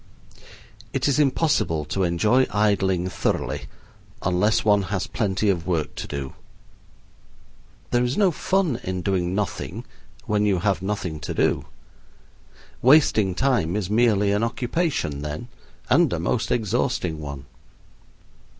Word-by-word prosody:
It 135 0 0
is 140 +1 +2
impossible 135 - +1
to 95 +6 -2
enjoy 100 +9 +3
idling 95 -4 +1
thoroughly - - -2 0.6
unless 90 +5 +2
one 105 -1 +4
has 95 -3 -1
plenty 105 -2 -1
of 90 -4 0
work 80 -4 -1
to - - -6
do. 70 -2 -5 1.6
There 120 0 +3
is 125 +1 -1
no 200 -3 +4
fun 180 -4 0
in 90 -1 -3
doing 95 -2 0
nothing 105 -1 -3 0.4
when 105 0 +1
you 100 -3 +2
have 95 +1 0
nothing 95 -5 -3
to 75 - -5
do. - - +1 1.2
Wasting 120 - +4
time 110 -9 +1
is 105 -2 -2
merely 105 -3 +3
an 105 +1 +1
occupation 120 - -1
then, 75 +1 -5 0.4
and - - +4
a - - -1
most - - -1
exhausting 90 -6 -1
one. 70 -2 -7
100 Hz, 130 wpm, -23 LUFS, 90-120 Hz, 1.6 s, one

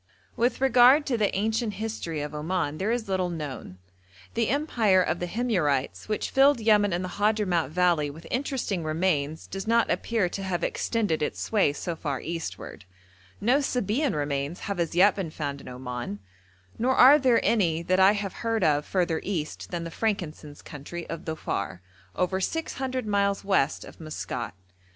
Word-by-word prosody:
With 240 +2 0
regard 265 +2 +6
to 260 - 0
the 215 -3 0
ancient 220 +1 0
history 195 -7 -4
of 150 0 -5
Oman, 155 0 -2
there 195 +3 0
is 235 -2 -1
little 185 -2 0
known. 145 - -6 0.6
The 230 -1 +1
empire 230 -9 +3
of 175 - -1
the 175 - -2
Himyarites, 175 - -1
which 215 -1 -2
filled 275 -1 +5
Yemen 210 -2 +4
and 175 +2 -1
the 185 - -7
Hadhramout 205 -8 +2
valley 170 -3 +2
with 155 +4 -11
interesting 250 - -2
remains, 155 -2 -1
does 195 +2 -6
not 230 0 +3
appear 225 -6 0
to 195 - -5
have 185 -2 -2
extended 210 -10 0
its 150 - -2
sway 205 -9 +2
so 165 +3 -4
far 145 -4 -3
eastward; 165 - -6 0.5
no 245 +7 +3
Sabæan 250 - 0
remains 145 +3 -2
have 200 -3 -4
as 170 -1 -1
yet 190 +3 +6
been 190 -5 -3
found 145 -2 -5
in - - -13
Oman, 125 -4 -5 0.6
nor 255 +3 +2
are 275 +4 +8
there 255 -4 +4
any 170 -7 +2
that 185 +2 +1
I 190 +2 +7
have 200 -2 -3
heard 225 -3 0
of 150 -2 +2
further 175 -4 0
east 165 -6 -4
than 175 -1 -3
the 165 - -6
frankincense 165 -8 -3
country 160 +4 -8
of 165 - -6
Dhofar, 130 - -3 0.4
over 185 +1 0
six 325 - -2
hundred 260 -2 -3
miles 200 -1 0
west 190 -7 +1
of - - -13
Maskat. 125 - -5
185 Hz, 175 wpm, -26 LUFS, 155-225 Hz, 0.6 s, are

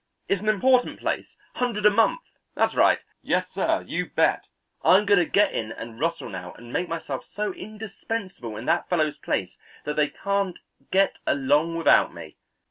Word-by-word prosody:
It's 195 -1 0
an 215 - 0
important 250 +4 +3
place, - - -3 0.2
hundred 230 -4 -1
a 210 - +8
month; 225 - +3 0.3
that's - - +2
right. - - +5 0.2
Yes, - - 0
sir; - - 0
you - - -2
bet, - - +1 0.4
I'm 195 +3 +6
going 200 -2 +5
to 175 - +1
get 205 - +3
in 110 -1 -3
and 115 0 -8
rustle 165 +3 -1
now 90 -1 -7
and 120 0 -12
make 180 - -1
myself 165 0 -4
so 210 -2 -4
indispensable 200 - -6
in 115 - -7
that 170 - +1
fellow's 155 -4 0
place 95 -1 -2 0.3
that 150 +1 -4
they 150 -1 +4
can't 200 0 -2 0.3
get 195 +1 +2
along 145 +4 +2
without 165 - +4
me. - - -10
180 Hz, 175 wpm, -25 LUFS, 145-210 Hz, 0.4 s, a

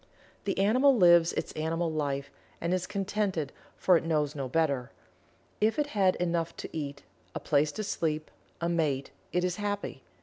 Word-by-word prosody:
The 195 - -1
animal 255 +7 +4
lives 175 -3 +6
its - - -3
animal 165 +2 -1
life 140 -3 -2 0.3
and 170 +2 -1
is 185 0 -1
contented, 195 -7 -1 0.2
for 180 -2 +5
it - - -3
knows 150 -3 0
no 140 -4 -3
better. 140 -4 +1 0.7
If 220 +5 +2
it 295 -1 0
has 190 -3 +3
enough 170 -1 -1
to - - -7
eat 140 -2 -4 0.3
a - - -1
place 150 +1 +2
to 215 - -3
sleep 155 -6 -2 0.3
a 170 - -1
mate 150 -6 0 0.2
it 180 - +1
is 180 -1 -1
happy. 205 -9 -3
170 Hz, 170 wpm, -29 LUFS, 150-195 Hz, 0.7 s, lives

